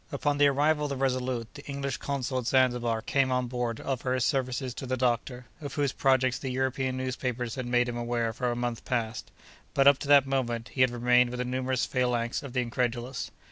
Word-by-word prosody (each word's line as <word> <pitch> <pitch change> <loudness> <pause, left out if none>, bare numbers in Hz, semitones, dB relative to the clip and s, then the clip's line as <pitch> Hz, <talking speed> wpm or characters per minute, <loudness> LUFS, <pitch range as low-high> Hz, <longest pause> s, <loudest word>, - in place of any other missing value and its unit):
Upon 145 0 0
the 145 - +7
arrival 150 +2 +2
of - - -2
the 140 - -3
Resolute, 130 -3 -1
the 145 - -10
English 140 -2 -3
consul 135 -2 -2
at 120 - -5
Zanzibar 120 -4 +2
came 135 0 +1
on 125 0 +1
board 120 -2 -2
to - - -10
offer 130 -1 -1
his 130 - +1
services 130 -2 -1
to 130 - -7
the 130 +1 -1
doctor, 125 0 -1 0.2
of 140 -2 -6
whose 145 -3 +1
projects 130 -2 +2
the 135 - -4
European 130 0 -1
newspapers 125 -2 -3
had 130 -2 -4
made 120 0 +2
him 120 -1 -3
aware 120 -1 -1
for 125 0 -1
a 120 - -1
month 120 -1 -3
past. 115 -3 -2 0.5
But, 135 - +4
up 140 -1 +7
to - - -6
that 140 -1 +7
moment, 120 -4 -2
he 130 - -2
had 130 - +6
remained 125 +1 +3
with 125 - -5
the 125 - -2
numerous 130 0 -1
phalanx 120 -2 0
of 140 -3 -8
the 130 - +1
incredulous. 120 +1 -2
130 Hz, 220 wpm, -28 LUFS, 120-135 Hz, 0.5 s, the